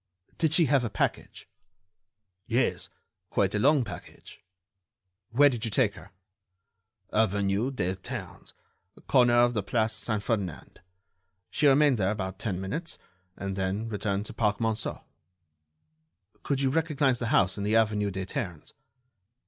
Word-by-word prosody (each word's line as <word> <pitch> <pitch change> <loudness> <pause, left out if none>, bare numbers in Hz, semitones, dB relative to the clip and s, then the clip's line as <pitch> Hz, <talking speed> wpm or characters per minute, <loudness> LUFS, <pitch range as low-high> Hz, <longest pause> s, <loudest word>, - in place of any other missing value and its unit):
"Did 160 -2 +2
she 165 +1 +4
have 135 -2 +3
a 120 - -1
package?" - - -3 1.0
"Yes, - - 0 0.4
quite 100 0 +1
a 105 - 0
long 140 +3 +4
package." 105 - -11 0.9
"Where 145 +5 +5
did 120 -5 -1
you 115 - -1
take 110 -1 +2
her?" 95 -2 -13 1.0
"Avenue 100 +2 +1
des 95 -9 -2
Ternes, 95 - -8 0.5
corner 120 -1 +4
of 120 0 +4
the 105 - 0
Place 110 +2 0
Saint 110 -2 -2
Ferdinand. 100 -9 -3 0.7
She 150 - +2
remained 140 -1 +5
there 95 -1 +2
about 95 -2 -4
ten 100 -5 -2
minutes, 125 - -4 0.4
and 100 -1 -4
then 95 +4 -2
returned 105 -1 -2
to - - -7
the - - -32
Parc 105 -3 +1
Monceau." 110 -1 -2 1.4
"Could 140 -1 -1
you 135 -1 +2
recognize 145 -5 +1
the 120 - -2
house 95 -3 +2
in - - -3
the 105 +2 +1
avenue 105 -2 +2
des 95 -1 -4
Ternes?" 90 -4 -5
110 Hz, 145 wpm, -28 LUFS, 100-125 Hz, 1.4 s, Where